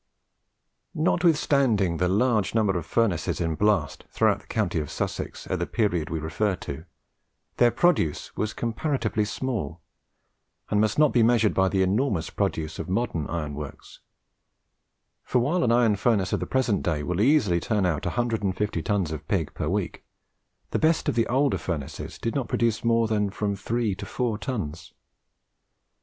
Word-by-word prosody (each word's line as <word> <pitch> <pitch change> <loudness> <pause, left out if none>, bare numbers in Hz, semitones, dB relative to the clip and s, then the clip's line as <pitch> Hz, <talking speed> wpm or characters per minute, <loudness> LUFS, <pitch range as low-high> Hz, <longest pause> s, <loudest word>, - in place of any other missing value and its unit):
Notwithstanding 140 - +2
the 90 +2 +1
large 110 +2 +1
number 105 -4 +2
of 85 -2 -3
furnaces 100 -4 0
in 80 -2 0
blast 95 -6 +1
throughout - - +2
the - - -22
county 95 -7 0
of 75 - -4
Sussex - - -4
at - - -2
the - - -1
period 90 -9 0
we 80 - -2
refer 85 +6 -1
to, 80 -1 -7 0.7
their 120 - +5
produce 120 - +1
was 105 0 -1
comparatively 115 -2 -1
small, 105 - -3 0.9
and 105 - +3
must 110 -1 +1
not 150 -1 +4
be 120 - +4
measured 115 -2 +4
by 95 0 +3
the 95 0 +2
enormous 95 - 0
produce 80 -5 -2
of - - -5
modern 95 -7 -1
iron 75 -4 -3
works; 75 -1 -9 1.2
for - - 0
while 155 +9 +2
an 115 - +2
iron 115 -3 +4
furnace 100 -3 +1
of - - +1
the - - -4
present 120 -6 +1
day 75 -4 -1
will 90 +4 -1
easily 110 - +3
turn 105 +2 0
out 80 -5 0
150 105 -6 -1
tons 95 -2 0
of 75 -1 -6
pig 85 -5 -1
per - - -3
week, - - -2 0.7
the - - 0
best 160 +1 +2
of - - +1
the 115 0 +1
older 135 +3 +2
furnaces 75 -6 -5
did 115 - -3
not 135 -4 -1
produce 115 -2 0
more 115 -1 +3
than 105 -2 +1
from 100 0 -2
three 115 +1 -1
to 95 - -7
four 115 -4 -2
tons. 100 - -5
105 Hz, 165 wpm, -26 LUFS, 85-120 Hz, 1.2 s, their